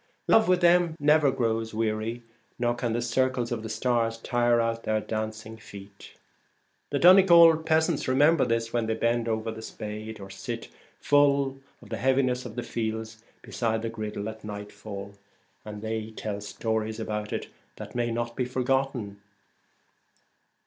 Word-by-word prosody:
Love 220 - +5
with 180 0 +3
them 175 -1 +4
never 150 0 +4
grows 115 -4 -1
weary, 110 +2 -2 0.3
nor 120 -1 +1
can 120 -1 -2
the 120 +1 -1
circles 125 0 0
of 115 -2 -2
the 110 - -6
stars 115 -2 0
tire 120 0 +1
out 115 0 0
their 110 -1 0
dancing 110 0 -5
feet. 100 -2 -13 0.7
The - - -1
Donegal 170 -3 +8
peasants 160 0 +1
remember 145 +4 +4
this 115 -1 -1
when 120 -2 0
they 110 - 0
bend 115 +1 0
over 110 0 -1
the 110 0 -8
spade, 110 0 -7
or 95 -1 -9
sit 115 +3 -6 0.3
full 140 -2 +3 0.2
of - - -15
the - - -3
heaviness 130 -1 +1
of 110 - -11
the 120 - -3
fields 110 -1 -4 0.2
beside 110 -2 -2
the 115 - -2
griddle 110 -2 -5
at 110 0 -8
nightfall, 105 -1 -8 0.5
and 105 0 -8
they 110 0 -3
tell 105 -2 -5
stories 110 +1 -3
about 105 -1 -4
it - - -4 0.3
that - - -8
it - - -18
may 120 -1 0
not 115 0 -3
be 125 - -1
forgotten. 125 -5 -1
115 Hz, 160 wpm, -27 LUFS, 110-130 Hz, 0.7 s, Donegal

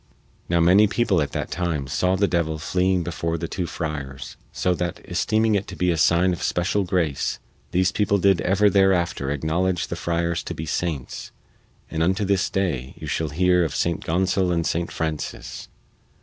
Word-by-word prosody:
Now 85 0 +2
many 95 +5 +6
people 100 -5 +1
at 75 - -2
that - - -3
time 85 -6 -1
saw 90 +7 +1
the 100 +1 +2
devil 80 -3 0
fleeing 90 +3 +1
before 85 0 -2
the 85 - -4
two 90 -1 -3
friars, 70 -5 -5 0.2
so 90 - 0
that, 85 -1 -3
esteeming 110 0 +1
it 100 -1 0
to - - -7
be 90 0 +1
a - - +1
sign 85 +3 +3
of 85 - -6
special 95 +3 0
grace, 85 -7 0 0.3
these 95 +1 +2
people 100 0 +1
did 95 -2 +3
ever 100 +3 +3
thereafter 95 -7 +2
acknowledge 85 +5 0
the - - -3
friars 85 0 -1
to - - -5
be 80 - -5
saints, 80 -3 -3 0.6
and 80 - -2
unto 95 +5 +1
this 100 -1 +1
day 75 -10 -2
you - - -8
shall 80 -1 -1
hear 90 +3 +3
of 80 - -2
St. 85 -1 0
Gonsol 90 +2 +1
and 85 -1 0
St. 85 +1 -1
Francis. 80 -2 -4
85 Hz, 180 wpm, -23 LUFS, 80-95 Hz, 0.6 s, many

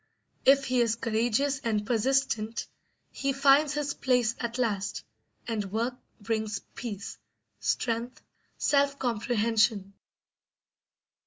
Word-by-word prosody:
If 275 0 +6
he 255 -1 +2
is 230 -1 +2
courageous 235 +5 0
and 215 -5 -1
persistent 230 -1 0 0.5
he 275 0 -1
finds 275 +2 +4
his 290 -1 -1
place 245 -3 +2
at 235 0 -3
last; 210 -6 -1 0.4
and 225 -3 -1
work 230 +4 -1 0.3
brings 220 -1 -2 0.2
peace, 205 -5 -6 0.4
strength, 235 +1 -1 0.4
self 280 -1 +2
comprehension. 220 -4 +1
235 Hz, 100 wpm, -28 LUFS, 220-270 Hz, 0.5 s, If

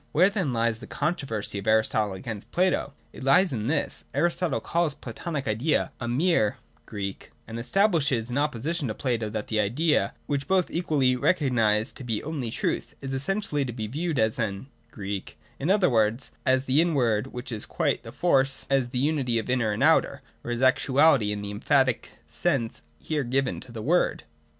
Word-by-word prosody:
Where 180 +6 +5
then 185 -9 -1
lies 115 -1 0
the - - -10
controversy 125 - -2
of 100 - -8
Aristotle 110 -2 +2
against 105 0 -7
Plato? 180 -5 +1 0.2
It - - -9
lies 140 +6 +4
in 110 -2 -2
this. 150 - -1
Aristotle 175 -3 +1
calls 170 -4 0
the - - -31
Platonic 140 +4 -5
idea 115 +9 +1
a 120 - -2
mere 130 - +2 0.3
Sivcfus, 100 -2 -5 0.2
and 115 +1 -6
estab 195 - +2
lishes 135 -8 0
in 125 - -1
opposition 150 +2 -1
to 110 - -3
Plato 115 -5 -1
that 105 0 -4
the 110 - -1
idea, 135 +11 +1
which 140 -1 -2
both 190 -2 +2
equally 150 -7 +2
recognise 120 -7 +2
to - - -8
be 115 -3 -1
the - - -11
only 145 -6 -3
truth, - - -2
is 135 -1 -5
essentially 150 +1 0
to 125 - -4
be 110 -2 -4
viewed 155 +7 -2
as 110 +4 +1
an 110 +3 -3 0.2
evepyaa, 100 -2 -5 0.2
in 145 - -1
other 195 -2 +4
words, 115 0 +1 0.2
as 130 +1 +3
the 135 +4 +4
inward 130 -9 +1
which 125 -1 -7
is 110 -2 -4
quite - - 0
to - - -27
the - - -9
fore, 175 -6 +3
or - - 0 0.3
as 135 -3 +2
the 125 - -4
unity 135 -3 +1
of 115 +2 -2
inner 120 -4 +1
and 105 - -1
outer, - - +3 0.2
or - - -6
as 120 +2 -1
actuality, 130 -2 +4
in 105 0 -4
the 100 - -4
emphatic 130 +2 +1
sense 135 -10 -1 0.2
here 150 - -2
given 130 +1 0
to 125 - -10
the 110 -2 -6
word. 175 +7 +1
130 Hz, 195 wpm, -26 LUFS, 110-150 Hz, 0.3 s, Where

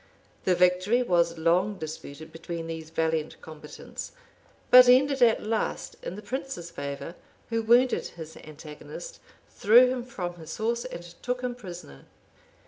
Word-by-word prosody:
The 185 - +3
victory 180 +7 +3
was 170 -5 +1
long 180 +5 +1
disputed 155 -1 -8
between 165 +1 -6
these 160 -1 -6
valiant 160 -1 -1
combatants; 150 -1 -9 0.6
but 250 0 +10
ended 270 +2 +4
at 230 -2 +4
last 220 +1 -2
in - - -6
the 210 - -9
prince's 260 -10 -5
favor, 140 +2 -6 0.4
who 230 0 +1
wounded 240 +3 +3
his 160 -1 -10
antagonist, 155 - -10 0.3
threw 245 +4 +6
him 255 -1 -3
from 180 -8 -6
his 160 -1 -8
horse, 235 +2 -1
and 175 -9 -7 0.2
took 250 0 -2
him 250 -1 -2
prisoner. 175 - -11
180 Hz, 140 wpm, -27 LUFS, 160-245 Hz, 0.6 s, but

